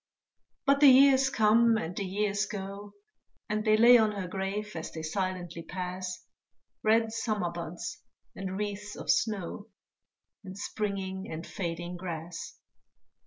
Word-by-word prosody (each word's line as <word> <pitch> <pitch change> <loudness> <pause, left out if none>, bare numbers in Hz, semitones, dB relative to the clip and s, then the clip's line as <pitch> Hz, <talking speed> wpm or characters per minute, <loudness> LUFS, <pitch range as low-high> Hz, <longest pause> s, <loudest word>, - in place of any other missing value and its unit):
But 275 0 +4
the 290 - +8
years 265 0 +6
come 225 -1 +4
and 175 -3 -4
the 200 - -2
years 205 +2 0
go, 200 0 -7 0.5
And 215 0 -1
they 215 -1 +4
lay 240 +2 +8
on 215 -1 +2
her 195 -3 -4
grave 195 +3 -3
as 160 0 -5
they 160 - -6
silently 175 0 -3
pass, 180 +1 -5 0.6
Red 225 +1 +3
summer 215 -6 -1
buds 170 +1 -6 0.3
and 190 0 -4
wreaths 205 0 -4
of - - 0
snow, 205 -1 -1 0.8
And 190 0 -9
springing 195 -2 -3
and 160 +1 -5
fading 175 -1 -4
grass. 170 -1 -6
200 Hz, 135 wpm, -29 LUFS, 180-215 Hz, 0.8 s, the